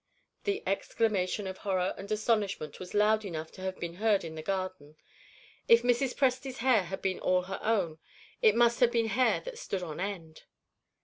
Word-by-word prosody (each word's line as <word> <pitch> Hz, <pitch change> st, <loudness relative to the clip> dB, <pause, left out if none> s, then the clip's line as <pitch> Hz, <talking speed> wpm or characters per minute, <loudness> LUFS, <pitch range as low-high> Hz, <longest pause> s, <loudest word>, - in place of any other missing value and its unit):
That 400 Hz, -, -2 dB
exclamation 200 Hz, 0 st, 0 dB
of 190 Hz, 0 st, -6 dB
horror 185 Hz, -2 st, 0 dB
and 200 Hz, -, -9 dB
astonishment 210 Hz, -7 st, 0 dB
was 185 Hz, +2 st, -8 dB
loud 215 Hz, +1 st, +4 dB
enough 160 Hz, -5 st, -5 dB
to 185 Hz, -, -12 dB
have 190 Hz, 0 st, -4 dB
been 170 Hz, 0 st, -5 dB
heard 210 Hz, -1 st, +2 dB
in 165 Hz, -1 st, -6 dB
the 160 Hz, -, -6 dB
garden. 185 Hz, -4 st, -4 dB, 0.7 s
If 230 Hz, 0 st, +6 dB
Mrs. 245 Hz, +1 st, +1 dB
Presty's 265 Hz, 0 st, 0 dB
hair 230 Hz, -6 st, +3 dB
had 190 Hz, +3 st, -6 dB
been 190 Hz, -1 st, 0 dB
all 185 Hz, 0 st, +2 dB
her 190 Hz, +1 st, -5 dB
own, 185 Hz, -8 st, 0 dB, 0.4 s
it 215 Hz, -1 st, +5 dB
must 235 Hz, 0 st, +4 dB
have 245 Hz, -2 st, +5 dB
been 230 Hz, -2 st, +1 dB
hair 255 Hz, +3 st, +2 dB
that -, -, -8 dB
stood 195 Hz, -, -3 dB
on 160 Hz, -2 st, -6 dB
end. 180 Hz, -5 st, -5 dB
200 Hz, 185 wpm, -30 LUFS, 185-230 Hz, 0.7 s, If